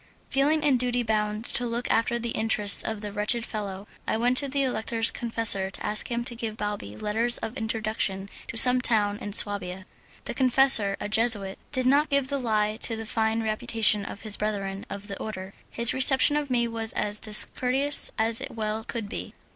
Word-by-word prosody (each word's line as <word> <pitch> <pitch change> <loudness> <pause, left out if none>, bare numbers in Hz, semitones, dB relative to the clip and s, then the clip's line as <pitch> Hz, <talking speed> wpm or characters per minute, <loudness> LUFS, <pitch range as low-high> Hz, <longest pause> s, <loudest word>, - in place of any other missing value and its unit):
Feeling 300 +3 +1
in 280 -4 +3
duty 245 0 -1
bound 215 0 -2
to 245 0 -2
look 235 +1 -4
after 230 +1 +1
the 235 0 -4
interests 215 -2 +3
of 220 -2 -4
the 210 -1 -6
wretched 210 +3 +1
fellow, 200 -2 -6 0.2
I - - 0
went 245 +2 +2
to 280 - -3
the 275 +1 -1
Elector's 225 -2 0
confessor 225 -5 0
to 190 - -8
ask 210 +4 +4
him 235 -1 -2
to 240 -1 -4
give 225 -2 -5
Balbi 205 - -5
letters 225 +3 +1
of 225 - -6
introduction 215 -3 -3 0.2
to 230 - -5
some 250 +2 +5
town 210 -4 +1
in 205 - -7
Swabia. 190 -3 +2 0.4
The - - -5
confessor, 255 -6 +3
a - - -4
Jesuit, 210 -3 +1
did 260 -2 -1
not 285 +4 +3
give 280 -2 0
the 280 -1 -2
lie 215 -3 -1
to 230 0 0
the 225 0 -7
fine 220 +1 -1
reputation 220 -1 +2
of 200 - -8
his 215 -2 +2
brethren 200 -2 -4
of 200 +1 -8
the 200 - -7
order; 190 -3 -7 0.2
his 235 0 +3
reception 265 +2 +4
of 295 -1 -2
me 240 -2 0
was 225 -1 -5
as 210 0 -2
discourteous 255 +6 +3
as 225 0 +1
it - - -5
well 220 0 -4
could 225 -2 -5
be. 200 - -7
225 Hz, 195 wpm, -25 LUFS, 210-245 Hz, 0.4 s, some